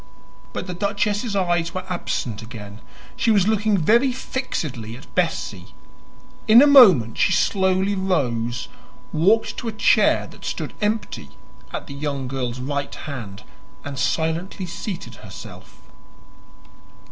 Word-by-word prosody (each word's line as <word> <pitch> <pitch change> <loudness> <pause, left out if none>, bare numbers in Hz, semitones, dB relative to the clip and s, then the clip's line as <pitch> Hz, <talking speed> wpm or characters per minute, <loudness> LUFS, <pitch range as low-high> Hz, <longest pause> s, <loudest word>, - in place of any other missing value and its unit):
But - - -4
the 180 - -5
duchess's 205 +3 -1
eyes 175 -3 0
were 185 0 -4
absent 120 - -3
again; 110 -2 -10 0.3
she - - 0
was 205 -3 +4
looking 215 -1 +2
very 235 - +3
fixedly 145 - -4
at 135 - -16
Bessie. 135 - -2 0.7
In 220 +2 +9
a 280 - +8
moment 195 - +7
she - - +3
slowly 190 +1 +2
rose, 125 - -1 0.5
walked 200 +8 +2
to 240 - -5
a - - -1
chair 205 -1 +3
that - - -15
stood - - -4
empty 210 - -2 0.4
at - - -5
the - - -9
young 140 -2 -3
girl's 125 -2 -3
right 140 +2 -3
hand, 110 -9 -7 0.4
and 140 -2 -5
silently 165 +7 -1
seated 180 +2 -6
herself. - - -12
175 Hz, 130 wpm, -22 LUFS, 130-205 Hz, 0.7 s, In